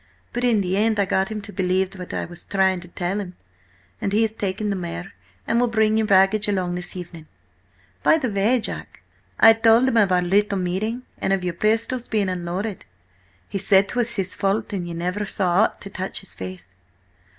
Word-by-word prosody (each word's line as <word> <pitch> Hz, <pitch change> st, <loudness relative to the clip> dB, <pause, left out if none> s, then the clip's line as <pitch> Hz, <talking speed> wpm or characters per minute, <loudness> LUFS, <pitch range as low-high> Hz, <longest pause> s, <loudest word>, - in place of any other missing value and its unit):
But 245 Hz, -, -2 dB
in 235 Hz, -4 st, +3 dB
the 185 Hz, 0 st, -1 dB
end 215 Hz, 0 st, +2 dB
I 200 Hz, -, +3 dB
got 190 Hz, 0 st, 0 dB
him 215 Hz, -1 st, -4 dB
to 205 Hz, -, -8 dB
believe 185 Hz, 0 st, 0 dB
what 180 Hz, -2 st, -8 dB
I -, -, -2 dB
was 175 Hz, 0 st, -11 dB
trying 190 Hz, -2 st, +1 dB
to 175 Hz, -, -11 dB
tell 175 Hz, +3 st, -3 dB
him, 180 Hz, -3 st, -6 dB, 0.7 s
and 195 Hz, -, -1 dB
he 215 Hz, +3 st, +3 dB
has 220 Hz, -, 0 dB
taken 205 Hz, 0 st, -2 dB
the -, -, -1 dB
mare, 175 Hz, 0 st, -6 dB, 0.3 s
and 230 Hz, +1 st, +1 dB
will 245 Hz, -, +3 dB
bring 220 Hz, -2 st, +2 dB
your 220 Hz, -1 st, +1 dB
baggage 200 Hz, +1 st, +4 dB
along 185 Hz, -3 st, 0 dB
this 180 Hz, +1 st, -5 dB
evening. 170 Hz, -3 st, -9 dB, 0.7 s
By -, -, +5 dB
the 255 Hz, -7 st, -2 dB
way, 210 Hz, +6 st, +2 dB
John, 220 Hz, -, -3 dB, 0.5 s
I 225 Hz, -, +9 dB
told 225 Hz, +2 st, +4 dB
him 235 Hz, -, +2 dB
of 205 Hz, -4 st, +4 dB
our 180 Hz, -1 st, +3 dB
little 200 Hz, +3 st, +2 dB
meeting, 200 Hz, +7 st, -2 dB, 0.2 s
and 195 Hz, -, +1 dB
of 190 Hz, -2 st, 0 dB
your 180 Hz, -1 st, -1 dB
pistols 225 Hz, +6 st, 0 dB
being 210 Hz, -3 st, 0 dB
unloaded. 180 Hz, +3 st, -3 dB, 0.6 s
He 195 Hz, -, -3 dB
said 195 Hz, 0 st, +4 dB
'twas 240 Hz, -1 st, -1 dB
his 195 Hz, -2 st, -2 dB
fault, 205 Hz, +2 st, -1 dB
and 180 Hz, -3 st, -3 dB
ye 170 Hz, -, -5 dB
never 180 Hz, +5 st, -2 dB
saw 185 Hz, -1 st, +2 dB
aught -, -, -5 dB
to 200 Hz, -, -9 dB
touch 190 Hz, 0 st, -4 dB
his 195 Hz, -, -10 dB
face! 95 Hz, 0 st, -8 dB
195 Hz, 210 wpm, -23 LUFS, 180-220 Hz, 0.7 s, I